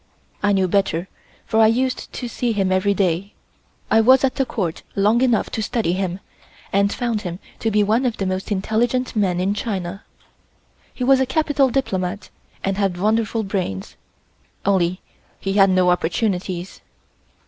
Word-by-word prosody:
I 205 Hz, -, +2 dB
knew 190 Hz, -2 st, +2 dB
better, 185 Hz, -2 st, 0 dB, 0.4 s
for 220 Hz, -, +1 dB
I 220 Hz, -, +7 dB
used 255 Hz, +3 st, 0 dB
to 245 Hz, -, -5 dB
see 235 Hz, 0 st, -1 dB
him 195 Hz, -3 st, 0 dB
every 190 Hz, +2 st, +2 dB
day. 190 Hz, +1 st, 0 dB, 0.6 s
I 225 Hz, -, +6 dB
was 260 Hz, +4 st, +5 dB
at 270 Hz, -, +2 dB
the 270 Hz, -2 st, -1 dB
Court 175 Hz, -7 st, -3 dB
long 210 Hz, +4 st, +3 dB
enough 245 Hz, -4 st, +2 dB
to 220 Hz, -, -2 dB
study 215 Hz, -5 st, 0 dB
him, 185 Hz, -1 st, -2 dB, 0.5 s
and 200 Hz, +1 st, +3 dB
found 235 Hz, -4 st, -1 dB
him 175 Hz, -4 st, -5 dB, 0.2 s
to 225 Hz, -, 0 dB
be 210 Hz, -1 st, +3 dB
one 225 Hz, +5 st, +2 dB
of 235 Hz, -, -3 dB
the 195 Hz, -, -2 dB
most 185 Hz, +2 st, -3 dB
intelligent 235 Hz, +6 st, 0 dB
men 190 Hz, -4 st, +1 dB
in 190 Hz, +2 st, +1 dB
China. 195 Hz, -3 st, -4 dB, 0.9 s
He 255 Hz, -, -5 dB
was 265 Hz, +1 st, +5 dB
a 265 Hz, -, +1 dB
capital 290 Hz, -1 st, +2 dB
diplomat 200 Hz, -7 st, -2 dB, 0.3 s
and 195 Hz, 0 st, -1 dB
had 195 Hz, -3 st, 0 dB
wonderful 220 Hz, +2 st, +1 dB
brains, 185 Hz, -, -3 dB, 0.7 s
only 185 Hz, -2 st, +1 dB, 0.4 s
he 195 Hz, -, -2 dB
had 195 Hz, -1 st, +5 dB
no 185 Hz, -1 st, +4 dB
opportunities. 180 Hz, 0 st, -2 dB
200 Hz, 165 wpm, -21 LUFS, 185-230 Hz, 0.9 s, I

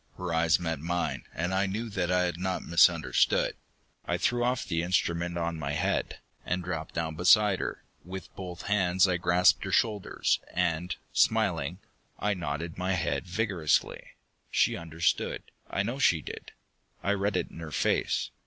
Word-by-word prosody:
Her 90 Hz, -2 st, -3 dB
eyes 80 Hz, -1 st, +3 dB
met 80 Hz, -3 st, -2 dB
mine 80 Hz, -3 st, -2 dB
and 90 Hz, +3 st, -2 dB
I 95 Hz, +1 st, +2 dB
knew 110 Hz, +5 st, -3 dB
that 90 Hz, -3 st, -1 dB
I 90 Hz, 0 st, +3 dB
had 90 Hz, -2 st, -2 dB
not 95 Hz, 0 st, -2 dB
misunderstood. 85 Hz, 0 st, +3 dB, 0.5 s
I -, -, -1 dB
threw 120 Hz, 0 st, +1 dB
off 125 Hz, 0 st, 0 dB
the 80 Hz, -2 st, -1 dB
instrument 85 Hz, -1 st, 0 dB
on 85 Hz, -1 st, -2 dB
my 70 Hz, -1 st, -3 dB
head, -, -, -1 dB, 0.3 s
and 90 Hz, 0 st, -2 dB
dropped 80 Hz, -3 st, -5 dB
down 80 Hz, -1 st, -1 dB
beside 95 Hz, +4 st, +5 dB
her. -, -, -4 dB, 0.2 s
With 95 Hz, 0 st, -8 dB
both 90 Hz, -3 st, -7 dB
hands 95 Hz, -2 st, +3 dB
I 90 Hz, -1 st, +1 dB
grasped 90 Hz, +1 st, +4 dB
her 95 Hz, -, -4 dB
shoulders, 105 Hz, -1 st, +1 dB, 0.2 s
and, 90 Hz, 0 st, 0 dB, 0.2 s
smiling, 85 Hz, +8 st, +1 dB, 0.4 s
I 105 Hz, +1 st, 0 dB
nodded 80 Hz, -1 st, -4 dB
my 95 Hz, +1 st, 0 dB
head 90 Hz, 0 st, -1 dB
vigorously. 90 Hz, -5 st, 0 dB, 0.5 s
She -, -, +2 dB
understood, 80 Hz, 0 st, -1 dB, 0.3 s
I -, -, 0 dB
know -, -, -3 dB
she -, -, +3 dB
did. -, -, -8 dB, 0.5 s
I 100 Hz, -, +1 dB
read 100 Hz, -1 st, 0 dB
it -, -, -3 dB
in -, -, -10 dB
her 80 Hz, -2 st, -6 dB
face. 75 Hz, -, 0 dB
90 Hz, 165 wpm, -29 LUFS, 85-95 Hz, 0.5 s, beside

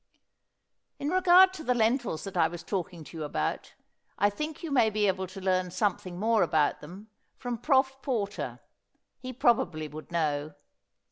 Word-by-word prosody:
In 285 Hz, -, -3 dB
regard 370 Hz, +1 st, +6 dB
to 335 Hz, -4 st, -8 dB
the 250 Hz, -4 st, +1 dB
lentils 230 Hz, -, 0 dB
that 195 Hz, -2 st, -7 dB
I 165 Hz, -2 st, +4 dB
was 170 Hz, +1 st, -8 dB
talking 175 Hz, -4 st, -4 dB
to 165 Hz, -, -11 dB
you 155 Hz, -, -4 dB
about, 145 Hz, -, -3 dB, 0.4 s
I 205 Hz, +1 st, +3 dB
think 305 Hz, +9 st, -5 dB
you 325 Hz, -, -4 dB
may 245 Hz, -5 st, +4 dB
be 210 Hz, 0 st, 0 dB
able 190 Hz, 0 st, -1 dB
to 190 Hz, +2 st, -10 dB
learn 185 Hz, -1 st, 0 dB
something 185 Hz, -2 st, -2 dB
more 220 Hz, +1 st, +2 dB
about 155 Hz, -3 st, +1 dB
them 190 Hz, +8 st, -11 dB, 0.3 s
from 245 Hz, -2 st, -4 dB
Prof. 270 Hz, -1 st, +2 dB
Porter. 215 Hz, -7 st, -3 dB, 0.6 s
He 255 Hz, 0 st, -6 dB
probably 235 Hz, -, +1 dB
would 155 Hz, +3 st, -10 dB
know. 150 Hz, -3 st, -1 dB
205 Hz, 165 wpm, -28 LUFS, 170-255 Hz, 0.6 s, regard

